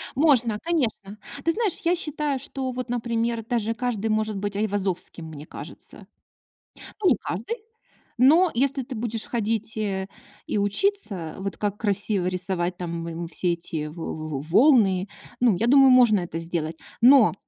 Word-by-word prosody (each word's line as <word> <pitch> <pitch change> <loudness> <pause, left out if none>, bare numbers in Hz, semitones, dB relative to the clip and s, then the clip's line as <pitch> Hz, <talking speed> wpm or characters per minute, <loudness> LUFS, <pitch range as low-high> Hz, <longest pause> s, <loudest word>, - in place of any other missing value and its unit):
Можно, 250 -8 +3
конечно. 220 - -2 0.3
Ты 330 - +2
знаешь, 425 -1 0
я 345 +1 +2
считаю, 300 -4 -2
что 260 0 -4
вот, 250 0 -5
например, 235 -1 -2
даже 225 -1 -1
каждый 230 -3 -2
может 215 -1 0
быть 205 0 -4
Айвазовским, 195 -5 -2
мне 155 -2 -9
кажется. - - -2 1.0
Ну 365 - +5
не 245 - +3
каждый. 225 - -4 0.6
Но 315 +9 +5
если 270 +2 +1
ты 250 +1 -8
будешь 225 0 -3
ходить, 225 -1 -2
э, 195 -3 -2 0.4
и - - -1
учиться, 205 - 0
вот 195 0 -5
как 205 -1 -2
красиво 205 -3 +1
рисовать 180 -1 0
там, 170 -1 -5
м, 170 0 -5
все 175 +1 +2
эти 165 -3 -4
во 160 +2 -6
во 155 -3 -5
волны, 195 - +3 0.3
ну, 240 -5 +4
я 230 - +1
думаю, 270 +1 +7
можно 235 -6 +5
это 165 -1 -5
сделать. 165 -1 -3 0.2
Но 250 -1 +7
215 Hz, 155 wpm, -24 LUFS, 185-250 Hz, 1.0 s, думаю